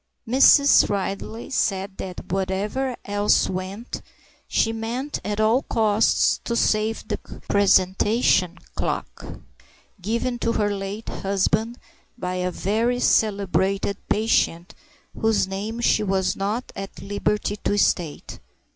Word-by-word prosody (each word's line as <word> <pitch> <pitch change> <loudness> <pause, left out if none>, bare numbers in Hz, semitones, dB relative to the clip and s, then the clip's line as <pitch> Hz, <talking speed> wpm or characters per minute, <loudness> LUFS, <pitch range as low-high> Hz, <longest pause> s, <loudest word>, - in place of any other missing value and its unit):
Mrs. 275 +3 +6
Ridley 200 +5 -4
said 195 -5 -1
that 185 -2 -7
whatever 200 +7 -1
else 205 0 +2
went, 190 +5 -5 0.5
she 225 - +1
meant 235 +6 -4
at 210 0 -3
all 220 +4 +3
costs 220 -3 +2
to 235 - -2
save 220 -1 0
the - - -2 0.3
presentation 190 -1 +3 0.2
clock - - -4 0.8
given 235 +5 -2
to 230 - 0
her 205 -2 0
late 200 +3 -6
husband 205 +4 -1 0.4
by 180 -5 -3
a 180 0 -1
very 225 +7 0
celebrated 195 -3 +1
patient, 210 -4 +1 0.4
whose 220 -3 +1
name 205 +4 -4
she 235 -2 +3
was 190 -2 0
not 210 +6 -3
at 195 0 -7
liberty 205 +1 -1
to 205 - -1
state. 170 -6 -1
205 Hz, 115 wpm, -23 LUFS, 195-225 Hz, 0.8 s, Mrs